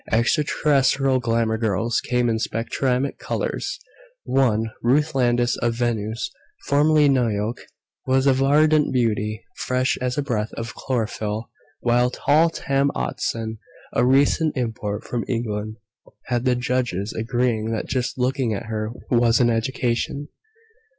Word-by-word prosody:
Extraterrestrial 135 +1 +2
glamour 115 -2 0
girls 110 +1 0
came 125 -1 0
in 110 -1 0
spectrumatic 125 +4 -1
colors: - - -3 0.5
one, 115 -4 +1
Ruth 150 +6 +2
Landis 120 -2 +2
of 120 -1 0
Venus 115 -1 -2 0.3
(formerly 150 +1 +4
Nuyok), 115 -4 +1 0.5
was 130 +1 +3
a 135 - +5
verdant 150 +3 +3
beauty, 110 -3 0
fresh 130 +1 0
as 125 +1 -1
a 145 - +1
breath 110 -6 -2
of 115 0 -5
chlorophyll; 110 -3 -3 0.3
while 120 +1 +3
tall 155 +6 +3
Tam 140 -3 0
Otteson, 115 -3 -3 0.3
a - - +2
recent 140 +4 +3
import 110 -4 -3
from 120 -1 -3
England, 110 -3 -3 0.5
had 120 0 -1
the 125 -1 +3
judges 120 -5 -1
agreeing 115 -1 -1
that 110 - -2
just 130 -1 -2
looking 125 -3 0
at 100 - -5
her 110 0 -3 0.2
was 120 -1 +4
an 120 -2 +4
education. 125 +4 -1
120 Hz, 130 wpm, -23 LUFS, 115-135 Hz, 0.5 s, a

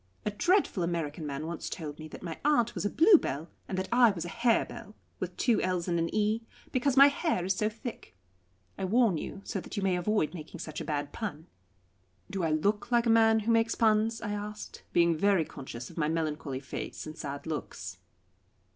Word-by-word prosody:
A 210 - 0
dreadful 350 - +2
American 165 -3 -2
man 140 +2 -4
once 170 0 -4
told 155 -4 -6
me 155 - -7
that 155 - -11
my 165 -3 -5
aunt 255 -6 +3
was - - -3
a - - +2
Bluebell 300 - +4 0.2
and 190 - -3
that 190 - -1
I 240 -1 +6
was 175 -5 -3
a - - -5
Harebell 230 -1 0 0.2
with 180 -1 -5
two 240 -3 +2
l's 180 -1 -1
and 170 -1 +1
an 165 0 0
e 215 +1 +1 0.3
because 265 +1 +1
my 275 - +11
hair 285 - +1
is 190 - +2
so 215 - +1
thick. 225 - -8 0.6
I - - -2
warn 215 -4 +3
you, 195 - -6
so 195 - -3
that - - -8
you 200 - -1
may 190 -2 +2
avoid 180 -2 +1
making 165 0 -8
such 155 0 -5
a - - -5
bad 145 -2 -2
pun." 165 -8 -5 0.9
"Do 195 - -2
I 165 - +2
look 200 +10 0
like 240 0 +4
a 230 - +4
man 225 -1 +5
who 225 +2 0
makes 230 0 +3
puns?" 220 0 +2
I 210 - -2
asked, 210 +1 -6
being 170 -1 +4
very 195 -1 +3
conscious 125 -5 -8
of - - -16
my 150 - +2
melancholy 155 -4 -2
face 135 - -6
and 155 0 -7
sad 140 -3 -6
looks. 160 -2 -5
190 Hz, 210 wpm, -30 LUFS, 160-225 Hz, 0.9 s, my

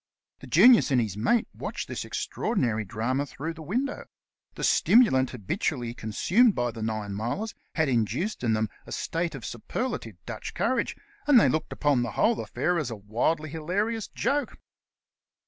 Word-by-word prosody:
The 135 - -11
Genius 215 - +7
and 130 -3 +3
his 110 -5 -1
mate 215 - +2
watched - - -5
this - - -4
extraordinary 120 - -1
drama 115 +7 -2
through 155 +5 -5
the 165 - -11
window. 250 - -2 0.5
The - - -6
stimulant 130 - +4
habitually 125 - -2
con 110 -2 -7
sumed 215 - +4
by 120 -1 0
the 115 0 -8
Ninemilers 110 - -3 0.2
had 160 -2 +2
induced 130 - -1
in 115 -2 +2
them 110 0 +1 0.2
a - - -10
state 165 -1 -2
of 120 -5 -8
superlative 240 - -4
Dutch - - -6
courage, - - 0 0.3
and 280 -5 +8
they - - +5
looked 155 - -1
upon 145 -4 +2
the 120 -3 -3
whole 225 -1 +3
afi^air 175 -1 -1
as 145 - -4
a 115 - -4
wildly 120 +10 -1
hilarious 200 +8 -2
joke. 290 +1 -1
145 Hz, 165 wpm, -27 LUFS, -, 0.5 s, and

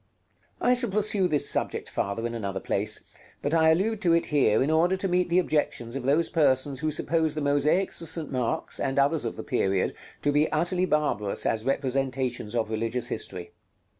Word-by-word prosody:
§ - - -40 0.6
LXII. 245 - +5
I - - +6
shall 245 -2 0
pursue 205 -1 +1
this 150 -4 +2
subject - - -1
farther 100 +4 -3
in 120 - -3
another 100 -4 -3
place; 105 +3 0 0.4
but 145 - -1
I 160 -1 +4
allude 200 +6 +1
to 170 -4 +3
it 170 - +2
here 130 -7 +2
in 145 - 0
order 170 +4 +3
to 195 - -2
meet 180 0 +1
the 170 - +2
objections 145 -8 0
of 135 - -3
those 150 +5 +3
persons 135 -3 +1
who 155 +1 -1
suppose 160 0 0
the - - -2
mosaics 145 +7 +1
of 165 - -3
St. 160 -1 0
Mark's, 125 -3 -1
and 135 - -2
others 140 0 +2
of 115 - -3
the - - -7
period, 95 -1 0 0.3
to 145 - +2
be 150 +2 +2
utterly 175 +4 +1
barbarous 150 - 0
as 110 -1 0
representations 130 -4 -1
of 110 -2 -1
religious 115 +2 -2
history. 85 -1 -5
145 Hz, 200 wpm, -26 LUFS, 120-165 Hz, 0.6 s, I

